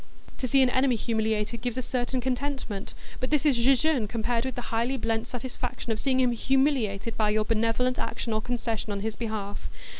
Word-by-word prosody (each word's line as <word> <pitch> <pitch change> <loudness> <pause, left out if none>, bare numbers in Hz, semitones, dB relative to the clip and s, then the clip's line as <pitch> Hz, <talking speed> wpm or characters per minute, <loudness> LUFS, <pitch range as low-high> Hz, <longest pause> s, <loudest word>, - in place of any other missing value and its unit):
To 255 - -1
see 270 +2 +5
an 255 - +4
enemy 260 -1 +3
humiliated 220 0 -1
gives 245 0 -2
a 255 - -1
certain 250 +1 -1
contentment, 260 -5 -3 0.2
but 255 - -2
this 300 0 +2
is 290 -4 +5
jejune 260 0 +3
compared 230 +2 -1
with 260 - -3
the 245 -2 -6
highly 235 +4 +1
blent 225 -1 -1
satisfaction 245 -1 -4
of 215 - -1
seeing 260 -2 +2
him 250 -1 +4
humiliated 235 -4 +1
by 215 -1 +3
your 215 0 +2
benevolent 230 +3 +1
action 230 - -2
or 215 - 0
concession 230 -2 -2
on 200 -1 -2
his 220 +1 -2
behalf. 215 -3 -4
240 Hz, 190 wpm, -27 LUFS, 220-260 Hz, 0.2 s, see